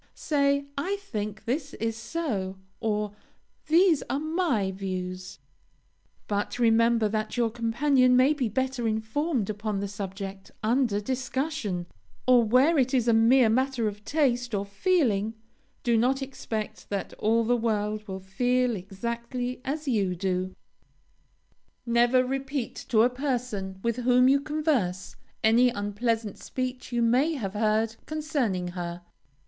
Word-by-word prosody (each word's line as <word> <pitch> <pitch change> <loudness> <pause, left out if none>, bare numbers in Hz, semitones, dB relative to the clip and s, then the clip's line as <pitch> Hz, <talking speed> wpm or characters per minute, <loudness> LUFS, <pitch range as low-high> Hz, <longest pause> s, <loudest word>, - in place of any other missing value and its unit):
Say, 280 -1 +1
"I 375 +8 -1
think 215 - -5
this 280 +4 -2
is 225 0 -2
so," 220 - -3 0.2
or 210 -2 -1 0.5
"these 335 0 +5
are - - 0
my 310 - 0
views," 185 -1 -5 0.9
but 205 +3 -2
remember 230 -1 +4
that 215 +3 -2
your 235 -2 +2
companion 250 +3 +3
may 260 +4 +5
be 260 -6 -1
better 260 +1 -1
informed 220 - -1
upon 210 -1 -3
the 200 - -2
subject 195 -1 -6
under 230 -2 +2
discussion, 255 - -2 0.4
or, 250 -2 +6
where 260 +8 +4
it 260 +1 +2
is 245 -2 +2
a 235 - +5
mere 230 +2 +5
matter 255 0 +1
of 210 0 -5
taste 245 -5 +1
or 200 0 -1
feeling, 225 - +1 0.5
do 235 -2 +2
not 260 +4 +2
expect 225 -5 -5
that 200 -1 -3
all 225 +2 +3
the 245 +2 +2
world 215 -2 -1
will 190 -1 -5
feel 245 +6 +1
exactly 235 +6 -4
as 295 +2 -3
you 200 -8 +1
do. 185 0 -2 1.3
Never 240 +2 +3
repeat 270 0 -3 0.2
to 220 -2 +5
a 245 - +4
person 245 -8 -3
with 235 0 0
whom 250 +1 +4
you 275 +1 +5
converse, 280 - -1 0.3
any 235 +3 +5
unpleasant 215 0 -2
speech 255 0 -4
you 240 -1 +1
may 260 +8 +3
have 200 -8 -4
heard 220 +1 +1
concerning 280 - -1
her. 175 -1 -5
235 Hz, 135 wpm, -27 LUFS, 205-260 Hz, 1.3 s, or